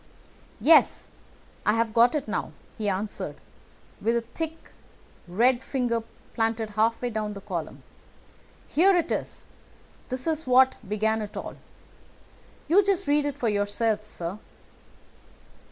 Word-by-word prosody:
"Yes, 320 +1 +4 0.5
I 210 - +3
have 225 -1 0
got 235 +4 +5
it 295 -2 -2
now," - - -3 0.3
he 210 -2 0
answered 200 +2 -3 0.7
with 230 +1 +1
his 235 - 0
thick 320 0 -5 0.6
red 240 +8 +2
finger 245 -4 -1 0.3
planted 225 -1 -1
halfway 230 +3 +1
down 215 -1 -2
the 200 - -9
column. 180 -5 -5 0.8
"Here 375 +5 +4
it 340 - 0
is. - - -3 0.6
This 255 0 -4
is 320 -3 -1
what 255 +1 +6 0.2
began 220 +1 +1
it 210 -1 -6
all. - - -6 1.1
You 370 +7 +5
just 395 -1 +1
read 290 0 +3
it 285 -1 -4
for 245 - -1
yourself, 210 +1 0
sir." 180 0 -5
230 Hz, 130 wpm, -26 LUFS, 215-285 Hz, 1.1 s, what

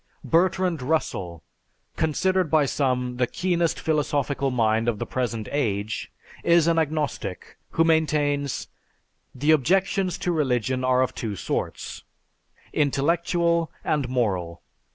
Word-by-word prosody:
Bertrand 180 -1 +2
Russell, 95 - -2 0.5
considered 185 +3 +1
by 155 -2 +4
some 125 -3 -1
the 125 -1 +2
keenest 175 0 0
philosophical 145 -3 0
mind 115 -2 +1
of 115 -3 +1
the - - -3
present 115 -4 -3
age, 110 -6 -2 0.3
is 170 -1 +5
an 165 -1 +3
agnostic 150 - -3
who 165 - +4
maintains 150 -4 +1 0.7
"The 145 +5 +2
objections 185 +5 +2
to 180 - -1
religion 130 -5 0
are 130 0 +3
of 130 - -2
two 110 -3 -4
sorts, - - -4 0.7
intellectual 170 +3 +1
and 145 -5 0
moral. 95 -9 -1
145 Hz, 115 wpm, -25 LUFS, 125-165 Hz, 0.7 s, is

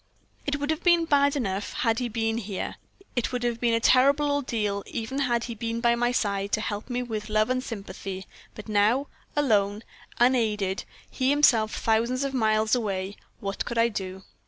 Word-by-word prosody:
"It 285 0 0
would 290 +2 -1
have 315 +1 -3
been 345 -2 +4
bad 285 -2 +3
enough 200 -6 -2
had 225 -2 +1
he 245 -1 -2
been 225 0 -1
here; 200 -3 -5 0.4
it 245 - 0
would 250 -1 -2
have 240 -1 -1
been 235 -1 +2
a - - +2
terrible 280 +5 +4
ordeal 220 -8 -1
even 250 +4 -4
had 240 -4 +1
he 235 - -4
been 230 +1 -3
by 235 0 +3
my 240 +1 +1
side, 200 -4 -1
to 215 - +2
help 210 +2 -4
me 250 0 -1
with 215 -3 -5
love 215 +2 +2
and 255 0 0
sympathy; 195 -4 -6 0.3
but 215 - -9
now, 215 +6 +2 0.3
alone, 210 -7 +2 0.3
unaided 215 -6 +2 0.3
he 260 0 0
himself 245 -7 +4
thousands 235 +4 +1
of 275 -1 -2
miles 215 -3 +2
away 200 -5 -1 0.3
what 200 -1 -3
could 235 - -5
I 230 +1 +4
do? 190 -3 -5
230 Hz, 185 wpm, -26 LUFS, 210-255 Hz, 0.4 s, been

